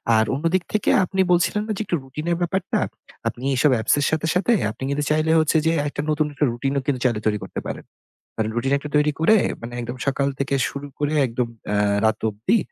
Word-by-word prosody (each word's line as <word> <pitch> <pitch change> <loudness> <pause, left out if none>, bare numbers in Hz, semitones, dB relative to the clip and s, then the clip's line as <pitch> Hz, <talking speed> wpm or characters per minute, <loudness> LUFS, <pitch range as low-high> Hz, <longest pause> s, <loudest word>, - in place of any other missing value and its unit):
আর 110 0 +4
অন্যদিক 165 +5 +1
থেকে 215 - +1
আপনি 190 +1 0
বলছিলেন 180 +4 +2
না - - -2
যে - - -2
একটু 175 - 0
routine 145 +5 -7
এর 170 - +1
ব্যাপারটা? 180 +2 0 0.5
আপনি 120 - -4
এইসব 135 +3 +3
apps - - +2
এর 145 - +1
সাথে, 160 0 0
সাথে 185 +6 +2 0.2
আপনি 120 - -9
কিন্তু 145 +1 0
চাইলে 155 +1 +2
হচ্ছে 160 0 +2
যে 160 - +4 0.2
একটা 145 - -3
নতুন 155 0 +2
একটা 145 - +1
routine 135 +4 -2
ও - - -5
কিন্তু 135 -3 0
চাইলে 120 -4 +2
তৈরি 105 -1 +2
করতে - - -5
পারেন। - - -6 0.5
মানে 110 -1 0
routine 130 +4 +1
একটা 150 +1 -8
তৈরি 150 0 +3
করে 215 +7 +5 0.2
মানে 115 +1 -7
একদম 120 +1 -5
সকাল 140 0 +1
থেকে 140 0 -1
শুরু 140 +1 -6
করে 145 0 0
একদম 120 0 -2 0.2
অ্যা 105 - 0 0.3
রাত 110 0 +2
অব্দি 110 - +1
145 Hz, 220 wpm, -22 LUFS, 125-160 Hz, 0.5 s, করে